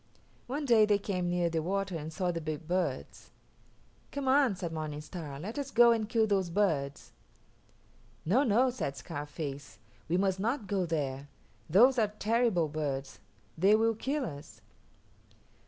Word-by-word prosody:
One 285 +4 -3
day 225 -4 +5
they 205 -1 +4
came 185 -3 -2
near 175 -1 +1
the 165 -1 -1
water 195 +2 -2
and 155 0 -5
saw 180 +2 -1
the 165 -1 -4
big 155 0 -5
birds. 170 - -2 0.8
"Come 280 -1 -4
on," 265 -5 +4
said 175 -3 -5
Morning 155 -2 -4
Star, 150 -3 -7
"let 215 - -5
us 280 -1 -4
go 240 -2 +6
and 220 -2 0
kill 225 -1 +3
those 195 -4 0
birds." 155 -8 -1 1.1
"No, 210 - +3
no," 250 0 +3
said 140 - -4
Scarface, 145 +1 -6 0.3
"we 175 - +2
must 190 0 +1
not 235 +3 -1
go 190 -2 -1
there. 140 -3 -3 0.4
Those 245 - +6
are 215 -2 +2
terrible 220 -7 +2
birds; 140 -3 -4 0.4
they 195 +6 +5
will 225 +1 +2
kill 270 +5 -2
us." 145 -6 -9
185 Hz, 155 wpm, -30 LUFS, 155-225 Hz, 1.1 s, go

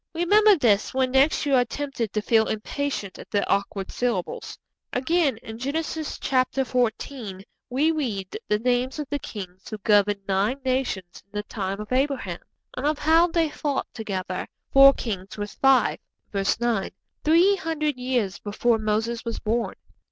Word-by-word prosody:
Remember 415 +5 +5
this 230 - +2
when 260 -1 +2
next 270 +4 +3
you 285 - +1
are 250 -2 +5
tempted 245 -4 -4
to 215 - -2
feel 220 -1 +3
impatient 220 -2 -3
at - - -11
the 205 -2 0
awkward 200 -1 -1
syllables. 235 -8 -2 0.3
Again, 280 0 +1
in 220 0 -8
Genesis 310 +3 -3
xiv. 250 -5 -1 0.3
we 285 +6 +2
read 220 -12 -3
the 210 - +2
names 250 +4 0
of 300 -2 -4
the 290 - 0
kings 190 -6 -8
who 215 - -5
governed 205 -1 +3
nine 200 +7 +1
nations 250 -9 -2
in 200 - -45
the 210 - -1
time 195 -2 -4
of 210 +2 -7
Abraham, 260 -10 0 0.4
and 265 +3 -1
of 305 0 +1
how 325 +3 +4
they 330 -3 +1
fought 290 -2 -2
together 190 -4 -4 0.3
'four 275 0 +9
kings 195 -4 -5
with 205 0 -4
five' 270 -1 +3 0.3
(verse 195 +1 0
9) 235 -5 0 0.3
three 345 +6 +5
hundred 305 -4 -1
years 250 -6 -1
before 225 +2 +1
Moses 220 +2 -1
was 230 -1 -3
born. 230 +2 -1
245 Hz, 160 wpm, -25 LUFS, 205-280 Hz, 0.4 s, four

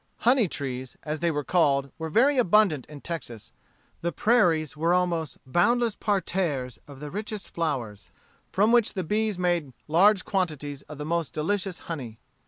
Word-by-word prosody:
Honey 245 -3 +5
trees, 130 -4 -5
as 155 0 -3
they 170 - +1
were 145 -2 -1
called, 140 -5 +2
were 160 0 -3
very 260 - +4
abundant 195 - +3
in 150 -2 -11
Texas 120 -10 -7 0.5
The 170 - -1
prairies 170 - +2
were 165 +4 +2
almost 170 -4 -1
boundless 230 - +2
parterres 170 - -1
of 140 -2 -12
the 150 -1 -6
richest 210 0 -5
flowers, 125 -11 -3 0.4
from 210 +4 +3
which 235 -3 +3
the 185 - -1
bees 210 +3 0
made 175 -6 0
large 190 +5 +4
quantities 150 -7 -2
of 150 - -8
the 150 - -5
most 170 0 -2
delicious 185 +3 -1
honey. 130 -9 -6
170 Hz, 160 wpm, -26 LUFS, 145-200 Hz, 0.5 s, Honey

